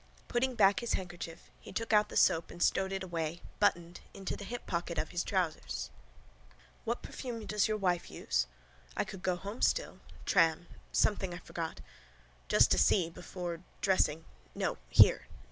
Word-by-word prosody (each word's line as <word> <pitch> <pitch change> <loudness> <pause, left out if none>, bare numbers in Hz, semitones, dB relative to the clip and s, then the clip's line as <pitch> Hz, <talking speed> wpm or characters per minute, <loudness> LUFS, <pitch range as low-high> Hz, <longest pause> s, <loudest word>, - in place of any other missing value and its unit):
Putting 250 +1 0
back 200 -2 +5
his 235 - -2
handkerchief 175 -2 -6
he - - -11
took 225 +3 -2
out 210 0 +5
the - - -3
soap 165 0 +4
and 175 - -10
stowed 190 +2 +2
it 190 -1 -2
away, 170 -2 -3 0.2
buttoned, 175 -4 +1 0.2
into 195 -1 -4
the 200 - -8
hip 245 +2 -6
pocket 170 -1 -2
of 155 +1 -1
his 175 - -1
trousers. 160 - -2 0.9
What 235 +2 -2
perfume 230 -4 -6
does 210 -1 +2
your 215 0 0
wife 180 -4 0
use? 65 -1 -1 0.5
I - - +2
could 190 - -9
go 185 -1 +1
home 200 +6 -7
still: - - +1 0.3
tram: 165 +1 +3 0.3
something 190 -4 +1
I - - -6
forgot. 165 -1 -5 0.7
Just - - +5
to - - +5
see: 170 -5 +4
before: 175 -1 -6 0.2
dressing. 165 -5 +2 0.3
No. - - -1
Here. - - +6
185 Hz, 165 wpm, -32 LUFS, 170-205 Hz, 0.9 s, Here